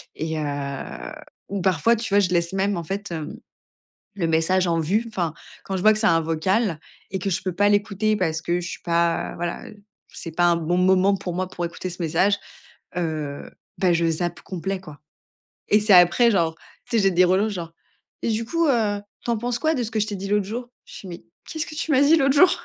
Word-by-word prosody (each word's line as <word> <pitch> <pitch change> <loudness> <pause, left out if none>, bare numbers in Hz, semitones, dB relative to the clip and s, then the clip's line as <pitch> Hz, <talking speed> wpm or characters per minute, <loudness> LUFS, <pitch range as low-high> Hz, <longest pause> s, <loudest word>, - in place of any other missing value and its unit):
et 160 0 -3
heu 140 - -5 0.4
ou 200 -1 -3
parfois, 185 +5 +3
tu 225 +1 -4
vois, 200 - +6
je 200 - +3
laisse 170 -1 +1
même 195 +1 +1
en 170 - -3
fait, 195 +3 -5
hem, 165 +7 -5 0.8
le 175 -4 -1
message 165 +3 +2
en 165 -1 +1
vue. 200 +9 0
Enfin, 175 -7 -2 0.3
quand 195 - -2
je - - -3
vois 215 +2 +6
que 215 - -2
c'est 220 - +3
un 165 - +4
vocal 165 +3 0 0.3
et 190 - -2
que 195 - -2
je 180 - -1
peux 185 - -2
pas 205 +3 +3
l'écouter 205 +1 +1
parce 160 -4 -1
que 175 +2 0
je 175 - -5
suis - - -7
pas 170 -1 0
voilà, 175 0 -4 0.5
c'est 165 - -6
pas 175 - +3
un 175 0 +4
bon 170 +2 0
moment 190 +2 +4
pour 180 -2 -5
moi 185 +1 -2
pour 175 - -5
écouter 175 +2 -5
ce 175 0 -8
message. 175 +5 +2 0.6
Heu, 155 -4 -3 0.3
ben 185 -2 +3
je 170 0 +2
zappe 175 +2 -2
complet 190 +1 -4
quoi 155 -6 -12 0.7
et 210 - +6
c'est 210 -1 +3
après 180 +7 +6
genre, 165 -5 +1 0.3
tu 235 - +1
sais 210 - +3
j'ai 195 - +4
des 180 0 +4
relances 190 +4 +2
genre: 170 -3 -6 0.5
«et - - 0
du 225 +1 0
coup, 335 +6 +1
heu, 220 -6 +1 0.2
tu - - -5
en 230 - +1
penses 240 +2 -2
quoi 315 0 +2
de 250 - -1
ce 225 - -5
que 220 - -1
je 210 - 0
t'ai 205 - -3
dit 195 +1 -5
l'autre 205 0 +1
jour?» 240 +4 -5 0.2
Je - - -11
fais: 195 - -10
«Mais, 175 -1 -9 0.3
qu'est-ce 315 -1 -3
que 310 - -9
tu 320 0 -2
m'as 270 -2 +4
dit 290 +3 +6
l'autre 275 -2 +3
jour? 360 +5 +7
185 Hz, 235 wpm, -23 LUFS, 170-215 Hz, 0.8 s, jour